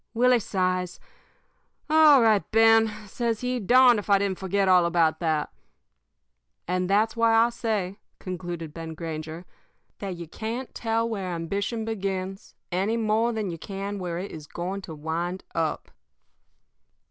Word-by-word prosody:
"Willie 250 Hz, +1 st, +4 dB
sighs. 185 Hz, -3 st, -1 dB, 0.9 s
"'All 305 Hz, -4 st, +6 dB
right, 215 Hz, -3 st, +4 dB
Ben,' 225 Hz, 0 st, +6 dB, 0.2 s
says 230 Hz, +2 st, -2 dB
he. 250 Hz, 0 st, -1 dB
'Darned 245 Hz, +2 st, +5 dB
if 205 Hz, -, -9 dB
I 200 Hz, -, +6 dB
didn't 195 Hz, -2 st, -2 dB
forget 195 Hz, +1 st, 0 dB
all 180 Hz, -2 st, +5 dB
about 165 Hz, -2 st, +2 dB
that.' 155 Hz, -3 st, -1 dB, 1.2 s
"And 180 Hz, +1 st, -1 dB
that's 215 Hz, +3 st, +2 dB
why 230 Hz, -1 st, +3 dB
I 230 Hz, +1 st, +4 dB
say," 210 Hz, -4 st, -2 dB, 0.2 s
concluded 175 Hz, -4 st, -6 dB
Ben 165 Hz, -1 st, -7 dB
Granger, 160 Hz, +1 st, -6 dB, 0.5 s
"that 195 Hz, -3 st, -4 dB
you 170 Hz, -1 st, -8 dB
can't 230 Hz, +9 st, -5 dB
tell 230 Hz, 0 st, -1 dB
where 200 Hz, -5 st, -3 dB
ambition 200 Hz, +6 st, -3 dB
begins 195 Hz, -3 st, -4 dB, 0.2 s
any 195 Hz, +6 st, 0 dB
more 225 Hz, +1 st, +1 dB
than 215 Hz, -5 st, -3 dB
you 165 Hz, -, -7 dB
can 200 Hz, +2 st, -5 dB
where 175 Hz, -2 st, -4 dB
it 190 Hz, +3 st, -5 dB
is 155 Hz, -2 st, -9 dB
going 185 Hz, +5 st, -4 dB
to 160 Hz, -, -6 dB
wind 170 Hz, +4 st, -3 dB
up." 165 Hz, -2 st, -2 dB
195 Hz, 145 wpm, -26 LUFS, 175-225 Hz, 1.2 s, All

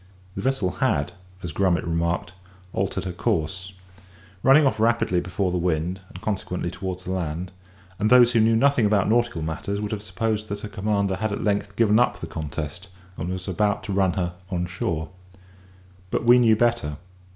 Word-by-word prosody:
The -, -, -5 dB
vessel 130 Hz, -8 st, 0 dB
had, 70 Hz, +5 st, +1 dB, 0.3 s
as 85 Hz, -, -4 dB
Grummet 90 Hz, +1 st, +1 dB
remarked, 85 Hz, +1 st, -1 dB, 0.4 s
altered 95 Hz, 0 st, -1 dB
her 95 Hz, -, -2 dB
course; 95 Hz, -1 st, -2 dB, 0.7 s
running 140 Hz, +6 st, +6 dB
off 135 Hz, -, +1 dB
rapidly 115 Hz, -5 st, +2 dB
before 90 Hz, +1 st, -1 dB
the 90 Hz, -, 0 dB
wind, 85 Hz, +1 st, -1 dB
and 90 Hz, -, -10 dB
consequently 95 Hz, -5 st, -3 dB
towards 95 Hz, 0 st, -5 dB
the 95 Hz, -, -4 dB
land; 90 Hz, -1 st, -3 dB, 0.5 s
and 105 Hz, +1 st, +2 dB
those 125 Hz, -1 st, +7 dB
who 120 Hz, -, +3 dB
knew 110 Hz, +1 st, +4 dB
nothing 120 Hz, -2 st, +4 dB
about 100 Hz, -2 st, +2 dB
nautical 120 Hz, -7 st, +1 dB
matters 80 Hz, +6 st, -3 dB
would 105 Hz, 0 st, -3 dB
have 105 Hz, -2 st, -3 dB
supposed 105 Hz, +2 st, -2 dB
that 100 Hz, 0 st, -4 dB
her 105 Hz, -, -6 dB
commander 100 Hz, -1 st, 0 dB
had 110 Hz, +1 st, -1 dB
at 100 Hz, -, -3 dB
length 100 Hz, -1 st, -1 dB
given 110 Hz, 0 st, +4 dB
up 105 Hz, -6 st, +2 dB
the -, -, -5 dB
contest, 80 Hz, +2 st, -5 dB, 0.3 s
and 85 Hz, +1 st, -4 dB
was 90 Hz, +1 st, -5 dB
about 105 Hz, +3 st, 0 dB
to 100 Hz, -, -4 dB
run 95 Hz, -2 st, +2 dB
her 85 Hz, -1 st, -2 dB, 0.2 s
on 90 Hz, -2 st, -1 dB
shore. 80 Hz, -2 st, -3 dB, 1.0 s
But -, -, -1 dB
we 120 Hz, +1 st, +7 dB
knew 115 Hz, -2 st, +5 dB
better. 115 Hz, -11 st, +1 dB
95 Hz, 185 wpm, -24 LUFS, 90-110 Hz, 1.0 s, those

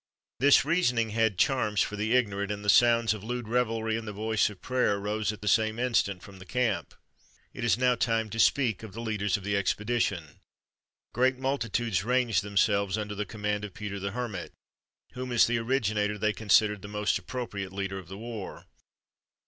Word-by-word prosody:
This 140 Hz, 0 st, +5 dB
reasoning 125 Hz, -9 st, +1 dB
had 110 Hz, -3 st, +1 dB
charms 105 Hz, -2 st, +2 dB
for 105 Hz, -, -1 dB
the 110 Hz, +3 st, -1 dB
ignorant, 100 Hz, -5 st, 0 dB
and 105 Hz, 0 st, -5 dB
the -, -, +1 dB
sounds 115 Hz, 0 st, +4 dB
of 105 Hz, -2 st, -8 dB
lewd 120 Hz, 0 st, -4 dB
revelry 115 Hz, -2 st, 0 dB
and 110 Hz, 0 st, -5 dB
the -, -, -3 dB
voice 110 Hz, +1 st, 0 dB
of 100 Hz, -3 st, -12 dB
prayer 125 Hz, -5 st, +1 dB
rose 105 Hz, +1 st, -1 dB
at 105 Hz, -, -10 dB
the 105 Hz, -, -6 dB
same 110 Hz, +1 st, +2 dB
instant 115 Hz, -6 st, 0 dB
from 100 Hz, -1 st, -12 dB
the 95 Hz, -, -11 dB
camp. 125 Hz, -3 st, -1 dB, 0.6 s
It -, -, -6 dB
is 115 Hz, -4 st, +3 dB
now 125 Hz, 0 st, +3 dB
time 115 Hz, -2 st, 0 dB
to 115 Hz, -, -5 dB
speak 120 Hz, -5 st, +3 dB
of 110 Hz, -4 st, -10 dB
the 115 Hz, -, -7 dB
leaders 105 Hz, -4 st, -1 dB
of 100 Hz, -, -11 dB
the 100 Hz, +1 st, -1 dB
expedition. 100 Hz, -5 st, -1 dB, 0.7 s
Great 130 Hz, +2 st, +2 dB
multitudes 120 Hz, -6 st, -1 dB
ranged 125 Hz, -2 st, +2 dB
themselves 100 Hz, 0 st, +1 dB
under 105 Hz, -1 st, -4 dB
the 105 Hz, 0 st, -4 dB
command 105 Hz, -1 st, -3 dB
of 100 Hz, -3 st, -7 dB
Peter 105 Hz, -2 st, -5 dB
the 100 Hz, +1 st, -3 dB
Hermit, 110 Hz, -4 st, -5 dB, 0.6 s
whom, 125 Hz, 0 st, -6 dB
as 120 Hz, -, +5 dB
the 120 Hz, 0 st, 0 dB
originator, 110 Hz, -4 st, 0 dB
they 105 Hz, +1 st, +1 dB
considered 105 Hz, -1 st, +3 dB
the 100 Hz, -, -8 dB
most 105 Hz, 0 st, 0 dB
appropriate 100 Hz, -2 st, -5 dB
leader 95 Hz, 0 st, -4 dB
of 90 Hz, -, -12 dB
the 95 Hz, +3 st, -8 dB
war. 110 Hz, -2 st, -7 dB
110 Hz, 190 wpm, -28 LUFS, 100-120 Hz, 0.7 s, This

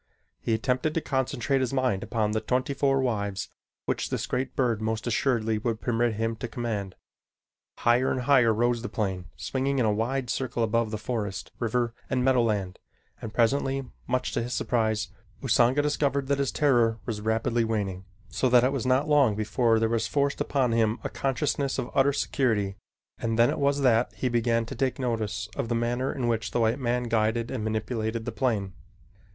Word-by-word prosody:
He 115 Hz, -, 0 dB
attempted 130 Hz, +6 st, 0 dB
to -, -, +3 dB
concentrate 130 Hz, 0 st, 0 dB
his 130 Hz, 0 st, -1 dB
mind 130 Hz, -8 st, +1 dB
upon 110 Hz, -3 st, -1 dB
the 110 Hz, 0 st, 0 dB
twenty 130 Hz, +2 st, 0 dB
four 135 Hz, -1 st, +2 dB
wives 100 Hz, -6 st, -2 dB, 0.4 s
which -, -, -1 dB
this -, -, -2 dB
great 130 Hz, -, -2 dB
bird 120 Hz, -5 st, +1 dB
most 110 Hz, 0 st, -2 dB
assuredly 115 Hz, -2 st, +1 dB
would 115 Hz, 0 st, -2 dB
permit 120 Hz, -1 st, 0 dB
him 115 Hz, +1 st, -1 dB
to 120 Hz, -, -4 dB
command. 105 Hz, -6 st, -4 dB, 0.8 s
Higher 120 Hz, +2 st, +3 dB
and 130 Hz, -, -1 dB
higher 125 Hz, -3 st, +5 dB
rose 120 Hz, +2 st, +1 dB
the 120 Hz, -, -5 dB
plane, 95 Hz, -4 st, -2 dB
swinging 135 Hz, +1 st, -1 dB
in 125 Hz, -, +2 dB
a 105 Hz, -, +2 dB
wide 120 Hz, +3 st, -1 dB
circle 120 Hz, -3 st, -1 dB
above 115 Hz, 0 st, +1 dB
the 110 Hz, -, -3 dB
forest, 110 Hz, -3 st, -4 dB
river, 120 Hz, 0 st, 0 dB, 0.2 s
and 125 Hz, -2 st, +1 dB
meadowland 110 Hz, -8 st, +1 dB, 0.4 s
and 110 Hz, -, -5 dB
presently, 135 Hz, +4 st, +1 dB, 0.2 s
much 130 Hz, +1 st, 0 dB
to 120 Hz, -, -1 dB
his 120 Hz, +2 st, -3 dB
surprise, 110 Hz, -4 st, 0 dB, 0.3 s
Usanga 125 Hz, +3 st, +3 dB
discovered 140 Hz, -2 st, 0 dB
that 140 Hz, -1 st, +2 dB
his 140 Hz, -, 0 dB
terror 120 Hz, -6 st, +3 dB
was 105 Hz, -2 st, -3 dB
rapidly 110 Hz, +2 st, +1 dB
waning, 100 Hz, -5 st, -2 dB, 0.2 s
so 95 Hz, +8 st, 0 dB
that 125 Hz, 0 st, +6 dB
it 130 Hz, -, +3 dB
was 130 Hz, -3 st, -2 dB
not 130 Hz, +4 st, +2 dB
long 140 Hz, -8 st, +4 dB
before 110 Hz, +2 st, +2 dB
there 110 Hz, 0 st, +2 dB
was 110 Hz, -1 st, 0 dB
forced 140 Hz, +2 st, 0 dB
upon 130 Hz, -4 st, +1 dB
him 115 Hz, 0 st, +2 dB
a -, -, -2 dB
consciousness 140 Hz, 0 st, -1 dB
of 125 Hz, -2 st, -3 dB
utter 140 Hz, +1 st, +4 dB
security, 110 Hz, -8 st, 0 dB, 0.4 s
and 115 Hz, -1 st, -1 dB
then 120 Hz, +1 st, +5 dB
it -, -, -3 dB
was 140 Hz, 0 st, +2 dB
that 120 Hz, -2 st, +3 dB
he 130 Hz, -, -1 dB
began 115 Hz, -1 st, +1 dB
to 120 Hz, -, -7 dB
take 130 Hz, 0 st, -1 dB
notice 110 Hz, -5 st, -2 dB
of 135 Hz, -5 st, -3 dB
the 120 Hz, -, +1 dB
manner 120 Hz, +3 st, 0 dB
in 125 Hz, -3 st, -2 dB
which 110 Hz, -2 st, 0 dB
the -, -, -1 dB
white 115 Hz, +3 st, +2 dB
man 125 Hz, -1 st, 0 dB
guided 115 Hz, 0 st, 0 dB
and 125 Hz, -5 st, -3 dB
manipulated 110 Hz, +1 st, -2 dB
the -, -, -3 dB
plane. 105 Hz, -7 st, -1 dB
120 Hz, 190 wpm, -27 LUFS, 110-130 Hz, 0.8 s, that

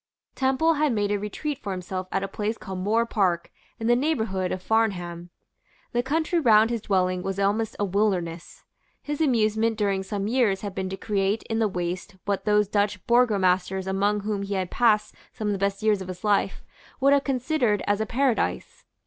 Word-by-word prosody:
Temple 270 Hz, +5 st, +2 dB
had 300 Hz, -5 st, +3 dB
made 205 Hz, -2 st, 0 dB
a 205 Hz, -, +1 dB
retreat 270 Hz, +8 st, -4 dB
for 205 Hz, -, -5 dB
himself 185 Hz, 0 st, -5 dB
at 195 Hz, -, 0 dB
a -, -, -2 dB
place 215 Hz, +3 st, -3 dB
called 190 Hz, -1 st, -6 dB
Moor 220 Hz, +5 st, +1 dB
Park, 185 Hz, -7 st, 0 dB, 0.3 s
in 225 Hz, -, -4 dB
the 240 Hz, +1 st, +4 dB
neighbourhood 220 Hz, -, 0 dB
of 185 Hz, -, -2 dB
Farnham. 180 Hz, -6 st, -1 dB, 0.6 s
The 240 Hz, -, +1 dB
country 315 Hz, +6 st, 0 dB
round 225 Hz, -5 st, +5 dB
his 230 Hz, -2 st, -2 dB
dwelling 185 Hz, -2 st, +1 dB
was 195 Hz, +1 st, -3 dB
almost 205 Hz, +3 st, 0 dB
a 205 Hz, -, 0 dB
wilderness. 180 Hz, -4 st, -1 dB, 0.4 s
His 295 Hz, +1 st, -4 dB
amusement 225 Hz, -5 st, +2 dB
during 200 Hz, -3 st, 0 dB
some 200 Hz, +1 st, -3 dB
years 220 Hz, -5 st, +2 dB
had 205 Hz, -2 st, -5 dB
been 190 Hz, -1 st, -3 dB
to 190 Hz, -, -5 dB
create 200 Hz, +1 st, 0 dB
in 225 Hz, 0 st, -2 dB
the 220 Hz, -, +3 dB
waste 180 Hz, +1 st, -4 dB
what 200 Hz, -1 st, -1 dB
those 210 Hz, -1 st, +3 dB
Dutch 205 Hz, -1 st, 0 dB
burgomasters 190 Hz, -6 st, +2 dB
among 200 Hz, +2 st, 0 dB
whom 205 Hz, -1 st, -2 dB
he 200 Hz, 0 st, -3 dB
had 185 Hz, -2 st, -2 dB
passed 220 Hz, -3 st, +2 dB, 0.2 s
some 215 Hz, -1 st, -3 dB
of -, -, +1 dB
the 195 Hz, -, -3 dB
best 200 Hz, +1 st, -1 dB
years 210 Hz, -3 st, +2 dB
of 190 Hz, -, -6 dB
his 185 Hz, +1 st, -8 dB
life, 205 Hz, -2 st, +1 dB, 0.4 s
would 275 Hz, +1 st, +5 dB
have 280 Hz, -1 st, +3 dB
considered 255 Hz, -5 st, 0 dB
as 205 Hz, +1 st, +1 dB
a 220 Hz, -, -1 dB
paradise. 255 Hz, +1 st, -1 dB
205 Hz, 195 wpm, -25 LUFS, 190-230 Hz, 0.6 s, round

